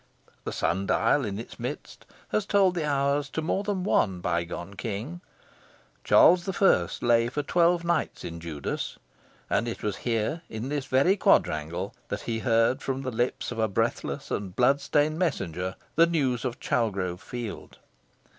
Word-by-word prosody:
The -, -, -2 dB
sun 95 Hz, +5 st, -1 dB
dial 135 Hz, +9 st, +3 dB
in 100 Hz, -4 st, -3 dB
its 115 Hz, -, -9 dB
midst 125 Hz, +5 st, -6 dB, 0.2 s
has 215 Hz, -1 st, 0 dB
told 195 Hz, -3 st, +4 dB
the 170 Hz, -4 st, -2 dB
hours 140 Hz, 0 st, +1 dB
to 160 Hz, -, -3 dB
more 190 Hz, +5 st, 0 dB
than 200 Hz, -3 st, -2 dB
one 95 Hz, -, +2 dB
bygone 85 Hz, +2 st, -3 dB
King. 115 Hz, -, -5 dB, 0.8 s
Charles 180 Hz, +1 st, +5 dB
I. 90 Hz, -, +4 dB
lay 115 Hz, -1 st, +3 dB
for 145 Hz, +4 st, -2 dB
twelve 170 Hz, +2 st, +3 dB
nights 170 Hz, 0 st, -1 dB
in 85 Hz, 0 st, -6 dB
Judas; 80 Hz, -4 st, -4 dB, 0.5 s
and 115 Hz, -, 0 dB
it 115 Hz, -, -5 dB
was 105 Hz, -2 st, -1 dB
here, 120 Hz, +7 st, -1 dB
in 110 Hz, +4 st, -5 dB
this 145 Hz, -2 st, -2 dB
very 135 Hz, +10 st, +4 dB
quadrangle, 75 Hz, -, +1 dB
that -, -, -4 dB
he 115 Hz, -1 st, -3 dB
heard 115 Hz, +3 st, +2 dB
from 135 Hz, 0 st, -3 dB
the 130 Hz, -, -3 dB
lips 120 Hz, +2 st, -1 dB
of 120 Hz, -, -5 dB
a 110 Hz, -, +3 dB
breathless 115 Hz, +3 st, -2 dB
and 95 Hz, -3 st, -3 dB
blood 135 Hz, +3 st, +3 dB
stained 150 Hz, +3 st, +1 dB
messenger 95 Hz, -, -1 dB, 0.2 s
the 165 Hz, +1 st, +6 dB
news 135 Hz, -8 st, 0 dB
of 120 Hz, -1 st, -3 dB
Chalgrove 95 Hz, -6 st, -1 dB
Field. 120 Hz, -4 st, -7 dB
120 Hz, 165 wpm, -27 LUFS, 100-150 Hz, 0.8 s, the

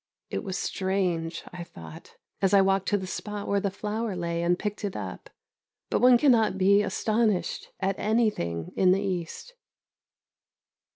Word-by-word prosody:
It -, -, -2 dB
was 190 Hz, -1 st, -3 dB
strange, 180 Hz, -4 st, -1 dB
I 175 Hz, -1 st, -6 dB
thought, 80 Hz, -, -12 dB, 0.3 s
as 195 Hz, 0 st, +4 dB
I 195 Hz, -, +7 dB
walked 195 Hz, 0 st, +2 dB
to 205 Hz, -, +2 dB
the 190 Hz, -, -5 dB
spot 205 Hz, +2 st, -5 dB
where 200 Hz, -, +2 dB
the 200 Hz, 0 st, -1 dB
flower 210 Hz, +1 st, -3 dB
lay 170 Hz, -1 st, -2 dB
and 175 Hz, +1 st, +2 dB
picked 210 Hz, +1 st, -4 dB
it 200 Hz, -2 st, -3 dB
up, -, -, -6 dB, 0.6 s
but -, -, +1 dB
one 250 Hz, 0 st, +7 dB
cannot 235 Hz, -7 st, +3 dB
be 200 Hz, +2 st, +5 dB
astonished 210 Hz, 0 st, 0 dB
at 195 Hz, 0 st, -1 dB
anything 210 Hz, -, 0 dB
in 185 Hz, -1 st, +5 dB
the 195 Hz, -, 0 dB
East. 190 Hz, -, -4 dB
195 Hz, 160 wpm, -27 LUFS, 180-210 Hz, 0.6 s, I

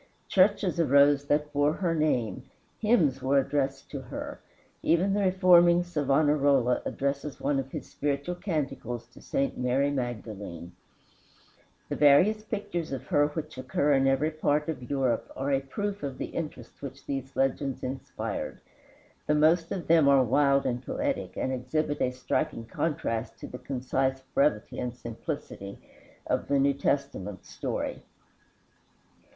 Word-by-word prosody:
Churches 190 Hz, -2 st, +3 dB
arose 140 Hz, -2 st, +5 dB
that 150 Hz, +1 st, 0 dB
bore 145 Hz, +1 st, +3 dB
her 170 Hz, -1 st, 0 dB
name, 150 Hz, -8 st, 0 dB, 0.4 s
hymns 170 Hz, -, +3 dB
were 135 Hz, +2 st, +2 dB
addressed 135 Hz, 0 st, -1 dB
to 140 Hz, -, -5 dB
her. 125 Hz, -, -7 dB, 0.4 s
Even 180 Hz, +4 st, +2 dB
the 205 Hz, -, +1 dB
reforming 180 Hz, -2 st, +5 dB
Savonarola 145 Hz, -5 st, +2 dB
addresses 140 Hz, +1 st, -2 dB
one 140 Hz, -2 st, +1 dB
of 135 Hz, 0 st, -5 dB
his -, -, -5 dB
spiritual 145 Hz, +4 st, -2 dB
canticles 150 Hz, -, -3 dB
to -, -, -16 dB
St. 135 Hz, -2 st, -1 dB
Mary 130 Hz, +3 st, +1 dB
Magdalene. 105 Hz, -, -5 dB, 1.2 s
The -, -, -3 dB
various 180 Hz, +10 st, +5 dB
pictures 200 Hz, -7 st, -4 dB
of 135 Hz, -3 st, -4 dB
her 145 Hz, 0 st, +4 dB
which 150 Hz, -2 st, -6 dB
occur 140 Hz, +3 st, +1 dB
in 135 Hz, 0 st, +3 dB
every 135 Hz, +4 st, +2 dB
part 150 Hz, -1 st, 0 dB
of 125 Hz, -6 st, -5 dB
Europe 130 Hz, -4 st, 0 dB
are 135 Hz, +2 st, -1 dB
a 135 Hz, -, +3 dB
proof 200 Hz, +9 st, -4 dB
of 135 Hz, -2 st, -4 dB
the -, -, -5 dB
interest 160 Hz, -3 st, -6 dB
which 140 Hz, 0 st, -8 dB
these 135 Hz, -1 st, -4 dB
legends 135 Hz, 0 st, 0 dB
inspired. 130 Hz, +1 st, -4 dB, 0.7 s
The 150 Hz, -, +3 dB
most 165 Hz, +3 st, +3 dB
of 180 Hz, -, -3 dB
them 160 Hz, -3 st, +5 dB
are 140 Hz, -2 st, +6 dB
wild 140 Hz, +3 st, +3 dB
and 125 Hz, +1 st, -1 dB
poetic, 285 Hz, -, -2 dB
and 130 Hz, -, -1 dB
exhibit 145 Hz, +4 st, -1 dB
a -, -, +3 dB
striking 125 Hz, 0 st, -2 dB
contrast 115 Hz, -3 st, -2 dB
to -, -, -8 dB
the 125 Hz, -, -8 dB
concise 130 Hz, 0 st, -1 dB
brevity 140 Hz, -7 st, +1 dB
and 125 Hz, -1 st, -3 dB
simplicity 120 Hz, -, -6 dB, 0.5 s
of -, -, -1 dB
the 140 Hz, -, +2 dB
New 140 Hz, +1 st, +3 dB
Testament 140 Hz, -9 st, -2 dB
story. -, -, -4 dB
140 Hz, 145 wpm, -28 LUFS, 130-155 Hz, 1.2 s, are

